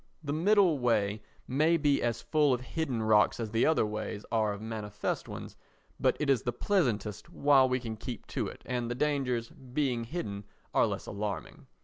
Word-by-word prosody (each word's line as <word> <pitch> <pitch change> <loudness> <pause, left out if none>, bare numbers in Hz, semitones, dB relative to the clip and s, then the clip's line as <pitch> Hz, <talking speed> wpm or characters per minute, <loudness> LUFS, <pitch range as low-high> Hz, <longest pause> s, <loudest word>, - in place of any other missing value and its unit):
The 145 -1 -2
middle 180 -1 +4
way 105 -4 +1 0.3
may 155 +6 +3
be 145 -2 +2
as 120 -1 -1
full 150 -4 +3
of 125 - -7
hidden 130 -4 -2
rocks 110 0 +4
as 110 -2 -3
the 115 +1 +3
other 160 -8 +3
ways 105 -1 -4
are 110 -2 +2
of 100 - -5
manifest 110 -1 -4
ones, - - -7 0.4
but - - +2
it 150 - 0
is 135 -5 +3
the 120 - -1
pleasantest 115 - 0
while 140 -2 +4
we 125 0 +1
can 115 -3 -5
keep 120 +1 -6
to - - -1
it - - -10
and 120 -2 -2
the 120 - -2
dangers, 125 -4 0
being 125 -2 -2
hidden, 105 - -5 0.3
are - - +4
less - - -4
alarming. 100 -1 -5
120 Hz, 190 wpm, -30 LUFS, 110-145 Hz, 0.4 s, middle